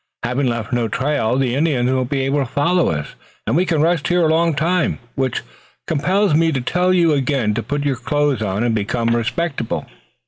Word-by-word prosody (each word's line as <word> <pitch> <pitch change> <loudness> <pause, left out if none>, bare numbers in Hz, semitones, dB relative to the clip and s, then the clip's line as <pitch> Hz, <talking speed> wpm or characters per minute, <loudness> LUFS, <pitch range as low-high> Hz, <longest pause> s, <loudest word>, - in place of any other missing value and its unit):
Having 125 +3 0
left 115 -1 -3
no 120 -2 +1
trail 130 +1 0
the 130 -3 0
Indians 135 -4 +1
won't 130 -1 0
be 140 -1 0
able 135 +2 0
to 135 - 0
follow 170 +8 +1
us, 75 -2 -4 0.3
and - - 0
we 180 +3 +2
can 160 -3 +2
rest 165 -2 +1
here 175 -1 +2
a 155 - +3
long 165 -1 +2
time, 170 +2 +1 0.2
which 130 -2 -2 0.4
compels 180 +5 +1
me 165 +1 +3
to 135 - -1
tell 180 +8 +1
you 170 -3 +3
again 135 -6 0
to 115 - -2
put 145 +6 -3
on 145 - -1
your 135 -3 0
clothes 145 0 0
and 110 +3 0
become 115 +2 0
respectable." 130 +2 -2
140 Hz, 205 wpm, -19 LUFS, 120-165 Hz, 0.4 s, a